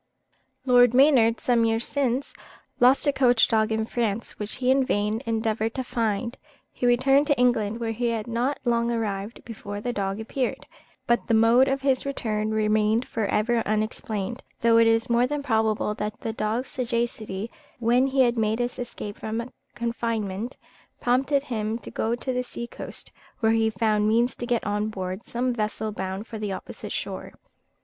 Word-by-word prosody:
Lord 245 Hz, -1 st, +5 dB
Maynard, 255 Hz, -5 st, +5 dB
some 240 Hz, -2 st, +2 dB
years 225 Hz, +1 st, +1 dB
since, 275 Hz, -1 st, -1 dB, 0.5 s
lost 255 Hz, +4 st, +5 dB
a 285 Hz, -, +3 dB
coach 245 Hz, -4 st, +4 dB
dog 220 Hz, 0 st, +2 dB
in 220 Hz, 0 st, 0 dB
France, 230 Hz, -1 st, -2 dB
which 210 Hz, 0 st, -4 dB
he 255 Hz, 0 st, +1 dB
in 270 Hz, 0 st, +4 dB
vain 210 Hz, -1 st, 0 dB
endeavoured 225 Hz, 0 st, -1 dB
to 260 Hz, -, -2 dB
find. 230 Hz, 0 st, -2 dB, 0.3 s
He 245 Hz, -, -1 dB
returned 270 Hz, +4 st, +4 dB
to 290 Hz, -, +2 dB
England, 230 Hz, -3 st, +2 dB
where 230 Hz, -1 st, -2 dB
he 240 Hz, +2 st, -1 dB
had 225 Hz, -2 st, -1 dB
not 240 Hz, +4 st, -1 dB
long 235 Hz, -1 st, +2 dB
arrived 215 Hz, -2 st, -3 dB
before 205 Hz, -3 st, -6 dB
the 245 Hz, +3 st, -3 dB
dog 195 Hz, -1 st, -2 dB
appeared; 245 Hz, +3 st, -3 dB, 0.4 s
but 235 Hz, 0 st, +1 dB
the 230 Hz, -, +3 dB
mode 230 Hz, +4 st, +5 dB
of 270 Hz, 0 st, 0 dB
his 270 Hz, -2 st, +1 dB
return 215 Hz, -6 st, -2 dB
remained 215 Hz, +2 st, +2 dB
for 220 Hz, -3 st, -2 dB
ever 230 Hz, +4 st, +1 dB
unexplained, 215 Hz, +1 st, -2 dB, 0.2 s
though 230 Hz, 0 st, +5 dB
it 230 Hz, 0 st, +6 dB
is 225 Hz, 0 st, +3 dB
more 240 Hz, +1 st, +3 dB
than 295 Hz, +1 st, -3 dB
probable 220 Hz, -4 st, +1 dB
that 210 Hz, +1 st, -4 dB
the 225 Hz, -, -3 dB
dog's 220 Hz, +4 st, -2 dB
sagacity, 230 Hz, -4 st, -3 dB, 0.3 s
when 245 Hz, +3 st, +3 dB
he 270 Hz, 0 st, +2 dB
had 240 Hz, -2 st, +3 dB
made 220 Hz, 0 st, +1 dB
his 245 Hz, +1 st, -3 dB
escape 210 Hz, -4 st, -6 dB
from 230 Hz, +3 st, -4 dB, 0.2 s
confinement, 230 Hz, -2 st, -3 dB, 0.4 s
prompted 270 Hz, +3 st, +2 dB
him 220 Hz, -4 st, -2 dB
to -, -, -10 dB
go 225 Hz, +2 st, 0 dB
to 255 Hz, +2 st, -3 dB
the 250 Hz, 0 st, -1 dB
sea 235 Hz, -1 st, -6 dB
coast, -, -, -8 dB, 0.3 s
where 220 Hz, -2 st, +3 dB
he 225 Hz, 0 st, +3 dB
found 215 Hz, -1 st, +1 dB
means 235 Hz, +3 st, +2 dB
to 240 Hz, -, -5 dB
get 240 Hz, -1 st, +1 dB
on 210 Hz, 0 st, -1 dB
board 190 Hz, 0 st, -5 dB
some 250 Hz, +1 st, -1 dB
vessel 215 Hz, -1 st, -2 dB
bound 190 Hz, 0 st, -4 dB
for 225 Hz, -2 st, -7 dB
the 210 Hz, -2 st, -3 dB
opposite -, -, -7 dB
shore. -, -, -5 dB
230 Hz, 180 wpm, -25 LUFS, 215-245 Hz, 0.5 s, it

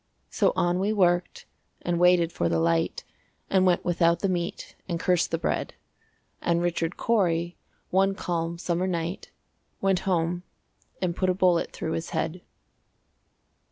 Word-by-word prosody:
So -, -, +2 dB
on 175 Hz, +1 st, +1 dB
we 200 Hz, +3 st, +1 dB
worked, 175 Hz, -4 st, +1 dB, 0.4 s
and 175 Hz, -1 st, 0 dB
waited 175 Hz, -1 st, +4 dB
for 85 Hz, -, 0 dB
the 85 Hz, -1 st, +1 dB
light, 85 Hz, 0 st, +1 dB, 0.5 s
And 190 Hz, -1 st, +4 dB
went 180 Hz, -, +2 dB
without 170 Hz, -1 st, +2 dB
the 195 Hz, -, +1 dB
meat, 175 Hz, -1 st, -3 dB
and 170 Hz, -1 st, -1 dB
cursed 180 Hz, 0 st, +2 dB
the 165 Hz, -, 0 dB
bread; -, -, -2 dB, 0.7 s
And 170 Hz, 0 st, +1 dB
Richard 170 Hz, -1 st, -1 dB
Cory, 175 Hz, -6 st, +1 dB, 0.4 s
one 195 Hz, +1 st, +3 dB
calm 170 Hz, -2 st, -2 dB
summer 175 Hz, +1 st, -1 dB
night, 170 Hz, 0 st, -3 dB, 0.5 s
Went 195 Hz, -2 st, +2 dB
home 175 Hz, 0 st, 0 dB, 0.6 s
and 175 Hz, -2 st, 0 dB
put 185 Hz, 0 st, +1 dB
a 180 Hz, -, +2 dB
bullet 180 Hz, -2 st, +2 dB
through 160 Hz, -, -4 dB
his 165 Hz, +1 st, -3 dB
head. 160 Hz, +2 st, -2 dB
175 Hz, 150 wpm, -26 LUFS, 170-185 Hz, 0.7 s, waited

